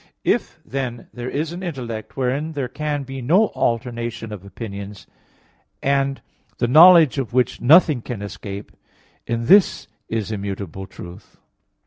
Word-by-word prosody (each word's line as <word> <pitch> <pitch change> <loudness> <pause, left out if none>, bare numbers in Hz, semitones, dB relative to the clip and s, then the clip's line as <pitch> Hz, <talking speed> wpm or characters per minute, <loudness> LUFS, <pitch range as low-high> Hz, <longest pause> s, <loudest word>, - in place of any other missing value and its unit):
If, - - 0
then, 125 -3 -5
there 120 +1 -5
is 155 +2 -2
an 175 - -7
intellect 125 - -6
wherein 135 +5 -1
there 140 -4 -2
can 150 +2 -3
be 135 0 -7
no 180 - +3
alternation 115 -1 -2
of 100 -3 -9
opinions, 100 -1 -8 0.7
and 135 0 0 0.3
the 120 - 0
knowledge 160 +1 +7
of 125 -3 -4
which 125 0 +1
nothing 150 0 +5
can 110 -3 -6
escape, 100 0 -7 0.6
in 115 0 -2
this 195 - +4 0.2
is 110 -1 -2
immutable 100 -2 -5
truth. 90 +3 -12
120 Hz, 135 wpm, -21 LUFS, 110-145 Hz, 0.7 s, knowledge